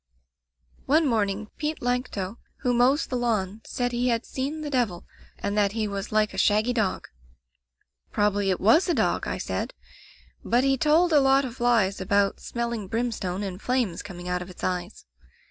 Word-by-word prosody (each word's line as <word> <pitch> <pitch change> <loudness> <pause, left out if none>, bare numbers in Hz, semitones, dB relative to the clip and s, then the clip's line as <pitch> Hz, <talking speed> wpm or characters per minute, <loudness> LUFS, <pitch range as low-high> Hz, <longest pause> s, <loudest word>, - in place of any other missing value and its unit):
"One 310 +4 +4
morning 215 -4 0
Pete 305 0 -2
Lancto, 245 -5 -2 0.2
who 250 - +1
mows 255 +5 +3
the 255 - -4
lawn, 220 -4 -1
said 245 -1 -2
he 245 +1 0
had 235 -1 0
seen 280 +4 -4
the 295 -1 -4
devil, 230 -10 0 0.3
and 200 - -3
that 205 -1 +2
he 220 -1 -1
was 200 0 -5
like 215 -2 +2
a 190 - -3
shaggy 215 +5 +3
dog. 215 -6 -1 0.5
"* - - -47
Probably 205 -1 +1
it 185 - +1
was 315 - +4
a 340 - +2
dog!' - - +1
I - - -2
said. - - -3 0.7
But 245 +2 +2
he 270 0 +3
told 315 +5 +3
a 295 - +7
lot 270 0 +4
of 255 0 -8
lies 225 -6 +2
about 200 +1 +1
smelling 235 -4 -3
brimstone 210 -4 -2
and 190 0 -5
flames 245 -9 0
coming 180 -3 -9
out 180 0 -1
of 180 - -8
its 180 - -12
eyes. 180 +2 -3
220 Hz, 180 wpm, -26 LUFS, 195-250 Hz, 0.7 s, a